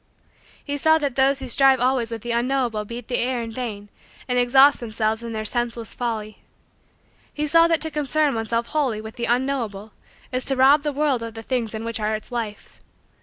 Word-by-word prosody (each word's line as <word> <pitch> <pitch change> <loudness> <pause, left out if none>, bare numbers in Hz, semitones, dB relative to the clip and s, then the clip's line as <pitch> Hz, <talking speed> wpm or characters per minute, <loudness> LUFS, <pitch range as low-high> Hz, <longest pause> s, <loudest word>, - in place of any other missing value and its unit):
He 285 0 -3
saw 315 +2 +4
that 285 -5 -2
those 270 +1 +2
who 265 - -5
strive 265 +1 +4
always 250 -2 +1
with 225 -2 -6
the 240 - -3
unknowable 240 -3 0
beat 235 +2 -8
the 245 - 0
air 245 -1 -1
in 230 - -6
vain 220 -4 -6 0.4
and 250 -1 +1
exhaust 265 +3 +5
themselves 220 -1 -2
in 235 0 -6
their 215 -1 -4
senseless 235 0 -2
folly. 220 -3 -4 0.9
He 300 - -2
saw 330 +3 +5
that 330 -2 +1
to 320 - -1
concern 300 0 +1
oneself 230 +1 -2
wholly 275 -8 0
with 220 0 -9
the 235 - -2
unknowable 235 -5 -2 0.4
is 255 0 0
to 270 - +2
rob 270 +3 +5
the 295 0 -2
world 285 -3 0
of 230 -1 -7
the 225 - -7
things 230 -3 -2
in 220 - -5
which 230 0 -3
are 215 0 0
its 215 - -9
life. 225 -4 -6
245 Hz, 205 wpm, -23 LUFS, 225-270 Hz, 0.9 s, exhaust